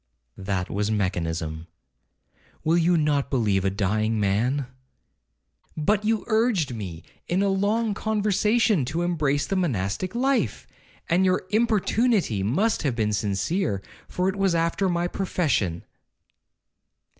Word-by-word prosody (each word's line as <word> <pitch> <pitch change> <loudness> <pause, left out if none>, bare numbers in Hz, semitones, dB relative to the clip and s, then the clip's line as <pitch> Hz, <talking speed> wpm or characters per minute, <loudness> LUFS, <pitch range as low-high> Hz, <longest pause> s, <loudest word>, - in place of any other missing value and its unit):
'That 95 -2 -2
was 105 +1 -2
mechanism—will 80 -5 -2 1.1
you 170 +1 +3
not 150 -3 +1
believe 105 -8 +1
a 95 - +2
dying 110 +3 0
man?' 115 +8 +1 1.1
'But 200 +7 +1
you 220 0 +1
urged 220 - +1
me, 90 -8 -6 0.2
in 185 +3 +1
a - - +2
long 205 +3 +1
conversation, 215 - +1
to 165 +7 -2
embrace 150 -5 0
the 195 - -2
monastic 165 - -1
life: 265 +2 0 0.4
and 180 +2 +3
your 185 0 +1
importunity 215 - +2
must 185 - +1
have 140 -6 -1
been 105 -2 0
sincere, 100 - -1 0.2
for 180 +1 -1
it 190 - 0
was 195 -3 +1
after 170 +3 +1
my 175 0 0
profession.' 145 - -1
160 Hz, 120 wpm, -25 LUFS, -, 1.1 s, you